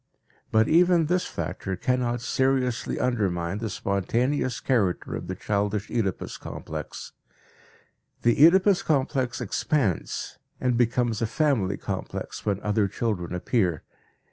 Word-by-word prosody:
But 110 Hz, 0 st, +4 dB
even 175 Hz, 0 st, +4 dB
this 180 Hz, +3 st, 0 dB
factor 95 Hz, -, -4 dB
cannot 120 Hz, +3 st, 0 dB
seriously 130 Hz, -1 st, 0 dB
undermine 100 Hz, -6 st, 0 dB
the 110 Hz, -1 st, -3 dB
spontaneous 115 Hz, +7 st, 0 dB
character 105 Hz, -9 st, 0 dB
of -, -, -5 dB
the 95 Hz, -, -3 dB
childish 105 Hz, +1 st, -1 dB
Oedipus 105 Hz, -6 st, -2 dB
complex. -, -, -7 dB, 1.1 s
The 120 Hz, +4 st, +4 dB
Oedipus 190 Hz, +3 st, +6 dB
complex 130 Hz, -4 st, 0 dB
expands 120 Hz, -, -1 dB, 0.2 s
and 125 Hz, -1 st, +1 dB
becomes 120 Hz, -1 st, +1 dB
a 115 Hz, -, +1 dB
family 115 Hz, -7 st, +1 dB
complex 95 Hz, +2 st, -5 dB
when 100 Hz, -2 st, +1 dB
other 105 Hz, -1 st, +1 dB
children 95 Hz, -4 st, -2 dB
appear. 90 Hz, -3 st, 0 dB
115 Hz, 115 wpm, -26 LUFS, 100-130 Hz, 1.1 s, Oedipus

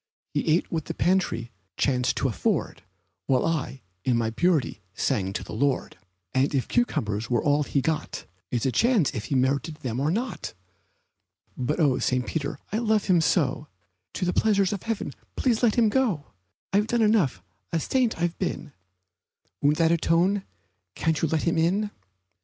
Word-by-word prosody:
He -, -, -1 dB
ate 160 Hz, +3 st, +2 dB
what 160 Hz, -3 st, -2 dB
the -, -, -5 dB
pantry 175 Hz, -11 st, +1 dB, 0.3 s
chanced 125 Hz, -3 st, +1 dB
to -, -, +1 dB
afford, 110 Hz, -8 st, -1 dB, 0.5 s
While 130 Hz, -2 st, +2 dB
I, 150 Hz, -5 st, -2 dB, 0.2 s
in 125 Hz, -2 st, +2 dB
my 115 Hz, -1 st, 0 dB
purity, 155 Hz, -, +1 dB
sang 95 Hz, -2 st, 0 dB
to -, -, -3 dB
the -, -, -9 dB
Lord; 135 Hz, +4 st, 0 dB, 0.4 s
And 135 Hz, +3 st, +2 dB
if 130 Hz, -, 0 dB
cucumbers 110 Hz, -, 0 dB
were 120 Hz, -2 st, +1 dB
all 145 Hz, 0 st, +3 dB
he 140 Hz, -1 st, 0 dB
got 160 Hz, +2 st, -2 dB, 0.2 s
It's 120 Hz, 0 st, -1 dB
a 130 Hz, -, +2 dB
chance 230 Hz, -, +3 dB
if 110 Hz, -, -4 dB
he 135 Hz, -, -2 dB
merited 140 Hz, +5 st, +1 dB
them 130 Hz, -6 st, -4 dB
or 145 Hz, +3 st, +1 dB
not. 230 Hz, +8 st, -3 dB, 1.0 s
But 130 Hz, +6 st, -2 dB
oh, 145 Hz, -5 st, +3 dB
St. 125 Hz, -1 st, 0 dB
Peter, 140 Hz, -2 st, -3 dB
I 215 Hz, -, 0 dB
love 220 Hz, -3 st, +2 dB
him 180 Hz, -4 st, +4 dB
so! 150 Hz, -3 st, +1 dB, 0.5 s
To -, -, -2 dB
the 180 Hz, -, 0 dB
pleasures 200 Hz, -3 st, +2 dB
of 200 Hz, -, -4 dB
heaven 225 Hz, -10 st, -3 dB, 0.2 s
please 240 Hz, -4 st, +1 dB
let 235 Hz, -4 st, +3 dB
him 235 Hz, -2 st, +4 dB
go! 210 Hz, -, +1 dB, 0.5 s
I've 205 Hz, +2 st, +3 dB
done 235 Hz, 0 st, +2 dB
enough 170 Hz, -, +2 dB, 0.3 s
a 165 Hz, -, +1 dB
saint 245 Hz, -, 0 dB
I've 175 Hz, 0 st, -1 dB
been 160 Hz, -5 st, -3 dB, 0.9 s
Won't 145 Hz, +1 st, +3 dB
that 165 Hz, -1 st, +3 dB
atone? 170 Hz, +4 st, +2 dB, 0.5 s
Can't 160 Hz, -2 st, 0 dB
you 165 Hz, -, +2 dB
let 155 Hz, 0 st, 0 dB
him 170 Hz, -1 st, +1 dB
in? 195 Hz, +6 st, +1 dB
160 Hz, 175 wpm, -26 LUFS, 130-195 Hz, 1.0 s, him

